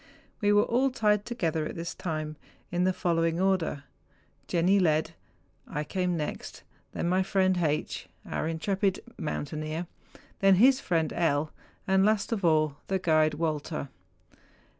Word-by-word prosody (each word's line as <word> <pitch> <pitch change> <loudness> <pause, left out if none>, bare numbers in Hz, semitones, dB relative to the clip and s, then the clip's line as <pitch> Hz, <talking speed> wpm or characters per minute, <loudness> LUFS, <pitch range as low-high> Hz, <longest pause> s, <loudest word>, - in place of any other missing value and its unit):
We 205 -1 +3
were 205 0 +5
all 255 +3 +2
tied 210 -4 +1
together 165 -10 -1
at - - -7
this 170 0 -4
time 155 -3 -4 0.4
in 175 +1 +1
the 185 - +3
following 165 -2 0
order:—Jenni 185 +1 -1
led, 160 -2 +2 0.6
I 150 - -3
came 180 +2 -1
next, 150 - -5 0.3
then - - -2
my 185 +2 +2
friend 185 -1 +2
H., 150 -3 -1 0.2
our - - -2
intrepid 190 +4 0 0.2
mountaineer, 155 +2 -3 0.5
then 195 -1 +6
his 255 +7 +5
friend 165 - 0
L., 155 -2 +1 0.3
and 190 0 +3
last 215 +1 +2
of 215 -4 -1
all 155 -3 +2
the 190 - +1
guide 155 -4 +2
Walter. 155 -2 -2
175 Hz, 140 wpm, -28 LUFS, 155-195 Hz, 0.6 s, then